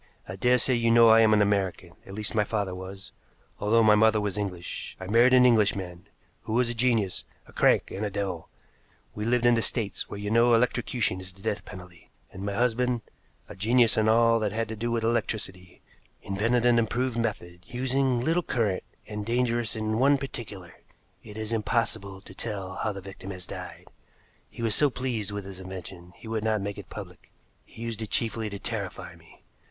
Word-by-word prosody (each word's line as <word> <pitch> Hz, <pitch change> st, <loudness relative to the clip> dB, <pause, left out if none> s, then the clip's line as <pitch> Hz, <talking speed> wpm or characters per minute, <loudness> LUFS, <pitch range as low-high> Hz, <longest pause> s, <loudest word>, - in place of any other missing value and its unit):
I 95 Hz, -, -6 dB
daresay 125 Hz, +5 st, +3 dB
you 115 Hz, -1 st, +2 dB
know 115 Hz, 0 st, +7 dB
I 110 Hz, 0 st, +7 dB
am 110 Hz, -1 st, +5 dB
an 105 Hz, -1 st, +5 dB
American 100 Hz, -3 st, -1 dB, 0.2 s
at 95 Hz, -, -8 dB
least 105 Hz, -1 st, -3 dB
my 105 Hz, -, +3 dB
father 105 Hz, -3 st, -2 dB
was, 95 Hz, +1 st, -9 dB, 0.5 s
although 115 Hz, +3 st, +3 dB
my 105 Hz, -1 st, +6 dB
mother 110 Hz, 0 st, +4 dB
was 105 Hz, -2 st, -2 dB
English. 95 Hz, -4 st, -5 dB
I 95 Hz, -, -6 dB
married 115 Hz, +6 st, +5 dB
an 125 Hz, 0 st, +7 dB
Englishman, 100 Hz, -7 st, +1 dB, 0.3 s
who 110 Hz, -, -5 dB
was 120 Hz, 0 st, +2 dB
a -, -, -2 dB
genius, 115 Hz, -5 st, +1 dB, 0.2 s
a -, -, -18 dB
crank, -, -, +3 dB
and 100 Hz, -, -4 dB
a 105 Hz, -, 0 dB
devil. 95 Hz, -4 st, -4 dB, 0.6 s
We 105 Hz, -, -4 dB
lived 120 Hz, +1 st, +2 dB
in 120 Hz, -, +6 dB
the 115 Hz, -, +2 dB
States, 110 Hz, -3 st, -2 dB
where -, -, -6 dB
you 105 Hz, 0 st, -3 dB
know 115 Hz, +1 st, +5 dB
electrocution 120 Hz, -4 st, 0 dB
is 95 Hz, 0 st, -7 dB
the 95 Hz, +2 st, -19 dB
death 110 Hz, -2 st, -2 dB
penalty, 90 Hz, -3 st, -12 dB, 0.2 s
and 95 Hz, -, -7 dB
my 100 Hz, 0 st, -2 dB
husband, 125 Hz, +1 st, +1 dB, 0.5 s
a -, -, -10 dB
genius 115 Hz, +4 st, +3 dB
in 110 Hz, 0 st, +3 dB
all 115 Hz, 0 st, +4 dB
that 105 Hz, -2 st, -1 dB
had 115 Hz, +1 st, -2 dB
to 110 Hz, -, -4 dB
do 115 Hz, +3 st, -3 dB
with 115 Hz, -1 st, -1 dB
electricity, 100 Hz, -6 st, -2 dB, 0.4 s
invented 115 Hz, +5 st, +1 dB
an 120 Hz, -1 st, +5 dB
improved 120 Hz, +2 st, 0 dB
method, 100 Hz, -7 st, -3 dB
using 130 Hz, 0 st, 0 dB
little 165 Hz, +6 st, +2 dB
current 110 Hz, -, 0 dB, 0.2 s
and 105 Hz, -1 st, -5 dB
dangerous 120 Hz, 0 st, 0 dB
in 110 Hz, 0 st, -1 dB
one 140 Hz, +2 st, +5 dB
particular 105 Hz, -9 st, -7 dB, 0.5 s
it 105 Hz, -, -11 dB
is 110 Hz, 0 st, -4 dB
impossible 105 Hz, -4 st, -1 dB
to 95 Hz, -, -13 dB
tell 100 Hz, -3 st, -4 dB
how 110 Hz, -, -1 dB
the 100 Hz, -1 st, -7 dB
victim 95 Hz, 0 st, -10 dB
has 90 Hz, -2 st, -6 dB
died. -, -, -8 dB, 0.6 s
He 115 Hz, -, -8 dB
was 115 Hz, -2 st, +2 dB
so 145 Hz, +5 st, +4 dB
pleased 125 Hz, -6 st, -3 dB
with 100 Hz, -1 st, -5 dB
his 95 Hz, -1 st, -8 dB
invention 95 Hz, -1 st, -9 dB
he -, -, -13 dB
would 110 Hz, -1 st, -2 dB
not 110 Hz, -1 st, +1 dB
make 100 Hz, 0 st, -4 dB
it -, -, -11 dB
public. -, -, -10 dB, 0.3 s
He 115 Hz, -, -11 dB
used 115 Hz, -1 st, -4 dB
it 110 Hz, -, -5 dB
chiefly 110 Hz, -1 st, -1 dB
to 100 Hz, -, -6 dB
terrify -, -, -5 dB
me. -, -, -20 dB
110 Hz, 200 wpm, -27 LUFS, 100-120 Hz, 0.6 s, know